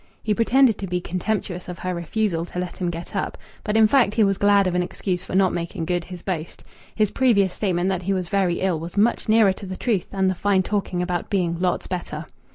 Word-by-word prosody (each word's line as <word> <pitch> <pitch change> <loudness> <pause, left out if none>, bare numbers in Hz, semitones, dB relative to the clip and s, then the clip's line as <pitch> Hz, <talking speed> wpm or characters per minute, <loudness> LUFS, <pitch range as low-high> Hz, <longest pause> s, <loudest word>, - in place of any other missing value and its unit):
He 215 - +1
pretended 235 +1 +3
to 195 - -4
be 180 0 -1
contemptuous 180 0 -3
of 180 - -6
her 185 0 -3
refusal 170 +1 -1
to 175 - -10
let 180 0 -4
him 180 -2 -1
get 170 0 -7
up, - - -2 0.3
but 210 +1 0
in 220 - +7
fact 225 -2 +3
he 225 - +4
was 195 -1 +1
glad 200 -1 +4
of 185 - 0
an 180 - +2
excuse 180 0 -3
for 190 - -5
not 190 -1 +3
making 170 -1 -3
good 175 -1 -1
his 180 -1 -9
boast. 170 -4 -4 0.3
His 215 -2 +2
previous 200 -8 +3
statement 185 -2 0
that 185 -2 -1
he 190 +2 -2
was 185 -2 -2
very 185 -2 +1
ill 185 -4 +1
was 170 +4 -8
much 220 +2 +2
nearer 215 -3 +5
to 195 +1 -9
the 185 0 -5
truth 215 -7 -1
than 190 -1 0
the 185 - +2
fine 190 +1 +1
talking 190 -3 -1
about 175 -1 -3
being 180 -5 0
"lots 180 -1 0
better." 170 -4 -5
185 Hz, 240 wpm, -23 LUFS, 175-205 Hz, 0.3 s, in